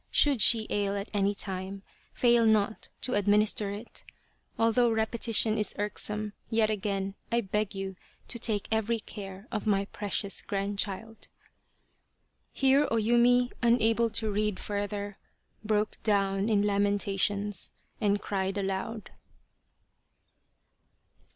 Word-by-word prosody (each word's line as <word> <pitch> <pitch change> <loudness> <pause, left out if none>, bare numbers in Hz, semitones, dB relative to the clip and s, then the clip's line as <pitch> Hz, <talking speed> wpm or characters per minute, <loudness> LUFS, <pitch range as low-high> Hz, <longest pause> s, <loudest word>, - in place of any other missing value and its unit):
Should 280 -6 +3
she 220 0 +6
ail 200 -1 0
at 200 - -6
any 200 0 +1
time, 195 0 -4 0.3
fail 240 -1 +3
not 220 -1 +2
to 255 - 0
administer 205 0 +2
it. 205 +4 -8 0.5
Although 230 +2 +3
repetition 220 0 +2
is 210 - -1
irksome, 210 0 -4 0.2
yet 220 -1 +2
again 195 -2 -2 0.2
I 235 0 +2
beg 210 0 -2
you 195 0 -4 0.4
to 235 - -3
take 215 -3 0
every 220 +1 +1
care 195 0 -9
of 215 0 -3
my 200 -1 +2
precious 200 0 -3
grandchild." 205 +2 -3 1.2
Here 275 +2 +3
O - - 0
Yumi, 240 +2 +3
unable 230 -1 +3
to 220 -1 +1
read 210 -1 -1
further, 205 0 -4 0.5
broke 215 0 -1
down 195 -1 +1
in 205 -2 +3
lamentations 200 0 +1 0.3
and 205 -2 +2
cried 195 0 -2
aloud. 195 +2 -3
210 Hz, 120 wpm, -29 LUFS, 200-225 Hz, 1.2 s, she